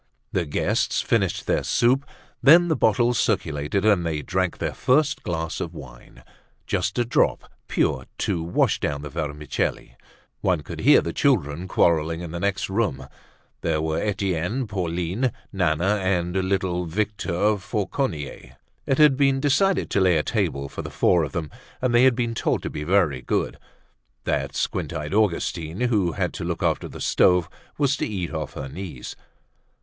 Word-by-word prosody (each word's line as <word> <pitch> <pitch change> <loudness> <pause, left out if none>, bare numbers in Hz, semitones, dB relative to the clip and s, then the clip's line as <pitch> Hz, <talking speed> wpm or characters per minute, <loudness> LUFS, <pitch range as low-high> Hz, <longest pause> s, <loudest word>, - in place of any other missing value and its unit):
The 90 - 0
guests 70 - 0
finished - - 0
their - - +1
soup. 130 +4 +2 0.3
Then 170 +5 +7
the 160 - +2
bottles 120 +1 +2
circulated 85 -1 0
and 100 -5 +4
they 80 -3 -2
drank 95 -1 -1
their - - -2
first 150 +3 +2
glass 80 -2 -3
of 85 0 -5
wine, 65 -5 -12 0.4
just - - -1
a 120 - +2
drop 120 - +1 0.2
pure, - - 0
to 85 - -1
wash 85 +2 +1
down 70 0 -2
the 75 - -7
vermicelli. 75 -5 -3 0.4
One 90 -5 +1
could - - -8
hear - - +6
the 85 - -4
children 90 - +1
quarrelling 85 -2 +2
in 85 -2 -6
the 85 - -4
next 100 +1 -1
room. 95 - -1 0.6
There 80 -2 0
were 80 +1 -1
Etienne, 100 +3 -1
Pauline, 90 +4 -1 0.2
Nana 90 +2 +1
and 90 -2 0
little 95 -2 0
Victor 105 +2 0
Fauconnier. 100 - -3 0.3
It 135 - +2
had 150 -3 +6
been 135 -1 +3
decided 170 +7 +2
to 100 - +2
lay 90 -3 +4
a 75 - +1
table 85 -11 -1
for - - -6
the - - -7
four 85 -2 +3
of 75 - -4
them, 80 -5 -3 0.3
and 125 -1 0
they 120 +2 +6
had 130 -2 +5
been 120 -1 -1
told - - -1
to - - -4
be 75 - -5
very 85 -6 +2
good. - - -2 0.6
That 70 -2 -1
squint - - -2
eyed 75 +3 -4
Augustine 90 -3 0
who 105 -9 +1
had - - -2
to - - -5
look - - -3
after - - 0
the - - -10
stoves 90 -2 +3 0.3
was 145 -1 +2
to - - -1
eat 95 -6 -4
off 75 -3 -4
her 70 - -6
knees. 75 -3 -7
90 Hz, 170 wpm, -24 LUFS, 80-110 Hz, 0.6 s, Then